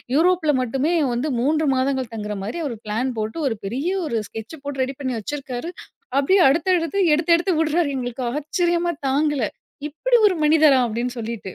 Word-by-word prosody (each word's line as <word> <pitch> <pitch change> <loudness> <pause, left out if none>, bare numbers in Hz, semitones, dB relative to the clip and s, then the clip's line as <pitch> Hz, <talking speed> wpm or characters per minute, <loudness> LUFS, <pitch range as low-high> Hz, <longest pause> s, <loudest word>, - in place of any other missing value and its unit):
யூரோப்புல 335 0 +3
மட்டுமே 270 +7 0 0.2
வந்து 250 +6 -1
3 305 +4 +1
மாதங்கள் 260 -2 -1
தங்கற 210 -1 -4
மாரி, 215 +12 -4
அவர் 255 -5 -3
பிளான் 225 +5 -1
போட்டு 220 +7 -3
ஒரு 235 - -1
பெரிய 255 - -3 0.2
ஒரு 235 - -1
ஸ்கெட்ச் 225 +7 -8
போட்டு 280 -2 -3
ரெடி 265 +1 -3
பண்ணி 260 -3 -2
வச்சிருக்காரு. 275 - -5 0.5
அப்படியே 330 +8 +4
அடுத்தடுத்து 335 +4 +1
எடுத்து 320 +3 +1
எடுத்து 355 +2 0
விடுறாரு. 320 0 +1
எங்களுக்கு 245 -1 -4
ஆச்சரியமா! 345 +2 0 0.2
தாங்கல, 285 -1 +1 0.4
"இப்படி 480 - +1
ஒரு 380 - +1
மனிதரா!" 300 -2 +5
அப்படின்னு 235 +2 -3
சொல்லிட்டு. 220 -4 -5
280 Hz, 160 wpm, -22 LUFS, 245-325 Hz, 0.5 s, மனிதரா